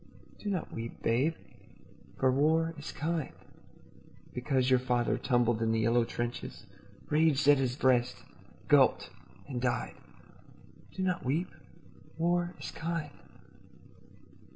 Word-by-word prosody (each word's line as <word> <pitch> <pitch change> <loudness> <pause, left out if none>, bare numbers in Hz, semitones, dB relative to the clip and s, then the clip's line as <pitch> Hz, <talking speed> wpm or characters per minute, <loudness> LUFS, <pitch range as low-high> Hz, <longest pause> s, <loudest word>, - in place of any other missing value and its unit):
Do 210 - -4
not 190 -3 -3
weep, 115 0 -7
babe, 135 +8 +2 0.8
for 130 -1 +3
war 160 +4 +2
is 150 -1 -7
kind. 160 -1 -3 1.0
Because 130 0 0
your 130 - +6
father 125 -2 +1
tumbled 120 -3 +1
in 110 0 +1
the 115 0 +1
yellow 115 +1 +3
trenches, 120 -1 -5 0.5
Raged 150 -2 +3
at 145 -1 +7
his 125 -2 0
breast, 125 -3 +1 0.4
gulped - - +4 0.4
and 125 -3 -4
died, 125 -1 -1 1.0
Do 190 - -2
not 180 -1 -1
weep. 155 +8 0 0.7
War 175 +1 0
is - - -6
kind. 165 -3 -4
135 Hz, 120 wpm, -31 LUFS, 120-160 Hz, 1.0 s, at